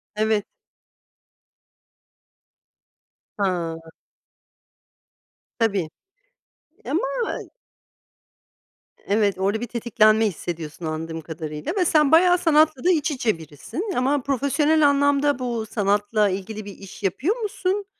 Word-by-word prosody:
Evet. 215 -1 +1 2.9
Ha. 165 -4 -2 1.7
Tabii. 200 -8 +1 1.0
Eee, - - -5
ama - - +1 2.0
Evet 205 -2 +1
orada 200 +3 0
bir 240 - -3
tetiklenme 220 -1 +3
hissediyorsun 165 -3 -6
anladığım 160 +1 -4
kadarıyla 155 -1 -5
ve 360 - +2
sen 300 -3 +3
bayağı 355 +2 +6
sanatla 310 -5 +3
da 365 - +4
iç 305 -2 +1
içe 240 - 0
birisin. 165 - -6
Ama 275 +3 +1
profesyonel 290 +3 +2
anlamda 285 -1 +2
bu 235 -3 -2
sanatla 205 0 +1
ilgili 200 +3 -5
bir 200 - -9
iş 195 +1 -12
yapıyor 260 - 0
musun? 410 -3 -2
220 Hz, 100 wpm, -23 LUFS, 190-290 Hz, 2.9 s, bayağı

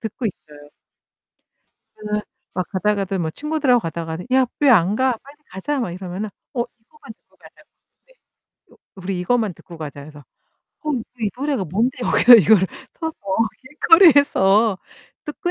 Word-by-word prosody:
듣고 225 +2 -4
있어요. 150 -5 -10 1.3
제가 210 0 -3 0.3
막 185 -1 -2
가다가도 195 -1 -1
뭐 160 -2 -2
친구들하고 290 - +1
가다가도 165 0 -5
"야 260 -1 +4
왜 290 - +4
안 195 -3 +4
가? 260 -1 +2
빨리 280 +2 -16
가자." 270 +10 -3
막 190 - -3
이러면은 185 +3 -6 0.3
어 240 - 0 0.2
이거만 245 -1 -15
듣고 - - -35
가자고. - - -19 0.4
네. - - -24 0.6
요 - - -20 0.2
"우리 185 -1 -4
이것만 220 0 0
듣고 170 - -14
가자." 145 -2 -7
해서 145 -1 -13 0.6
"어 305 -1 -3
너 240 -4 -2 0.2
이 210 -2 0
노래가 275 -6 -2
뭔데? 220 - -1
여기서 245 +1 +7
이거를 195 -1 +5 0.3
서서 320 -1 -5 0.5
길거리에서 265 - +4 0.5
듣고 350 +5 -4
215 Hz, 310 characters per minute, -20 LUFS, 180-265 Hz, 1.3 s, 여기서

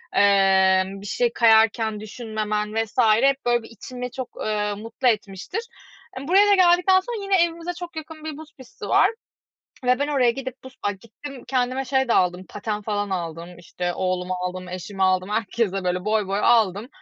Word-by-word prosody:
eee, 190 -1 +4
bir 195 +1 -9
şey 235 +3 0
kayarken 220 -1 +3
düşünmemen 215 -1 -4
vs. 225 0 -2 0.2
hep 275 0 +2
böyle 240 -1 +2
bir - - -12
içimi 250 +2 -7
çok, 260 -1 -6 0.2
eee, 210 -1 -1
mutlu 225 +5 -3
etmiştir. 210 - -1 0.6
Imm, 270 +2 -7
buraya 390 +4 +5
da - - +7
geldikten 365 +1 +5
sonra 430 +2 -5
yine 385 -3 +3
evimize 340 +1 -3
çok 350 -1 -9
yakın 315 0 -8
bir 310 -2 -6
buz 310 0 -12
pisti 260 -2 -10
var - - +4 0.8
ve 250 0 +3
ben 285 +1 -1
oraya 265 -5 +3
gidip 260 +1 -7
buz 260 0 -12
ay, 205 - -1
gittim, 250 +6 -11
kendime 255 +1 0
şey 265 0 0
de - - +3
aldım, 180 0 +1
paten 210 0 -4
falan 205 -1 -2
aldım 170 -1 -5
işte, 175 +1 -4
oğluma 185 0 -2
aldım, 180 0 -5
eşime 185 +2 -5
aldım, 185 +1 +2
herkese 210 -2 -1
böyle 180 0 -1
boy 215 -1 +1
boy 200 +1 -1
aldım, 220 -2 +3
220 Hz, 180 wpm, -23 LUFS, 195-265 Hz, 0.8 s, da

